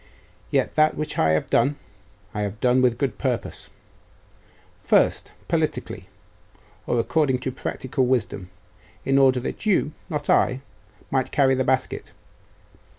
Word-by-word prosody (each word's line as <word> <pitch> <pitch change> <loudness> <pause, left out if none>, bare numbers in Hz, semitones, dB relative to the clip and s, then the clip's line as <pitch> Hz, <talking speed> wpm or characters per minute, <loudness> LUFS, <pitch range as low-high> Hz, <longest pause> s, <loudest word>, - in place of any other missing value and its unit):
Yet - - +1
that 155 0 +3
which 155 0 -3
I 80 - +3
have 80 - -1
done, 145 +1 +3 0.6
I 105 - -3
have 105 +1 -4
done 125 +1 +3
with 125 -2 +4
a - - -14
good 135 +2 -2
purpose. 125 -5 -3 1.1
First, - - +2 0.2
politically, - - -2 0.8
or 120 - +1
according 135 +2 +1
to 130 - -2
practical 130 +1 -2
wisdom 110 -7 -1 0.6
in 135 0 +3
order 130 -2 +4
that 215 - -5
you, 180 -7 +2 0.2
not 150 -3 -3
I, 130 +1 +3 0.5
might 130 -2 0
carry 135 -2 +3
the 130 0 +1
basket. 130 0 -1
130 Hz, 140 wpm, -24 LUFS, 125-140 Hz, 1.1 s, with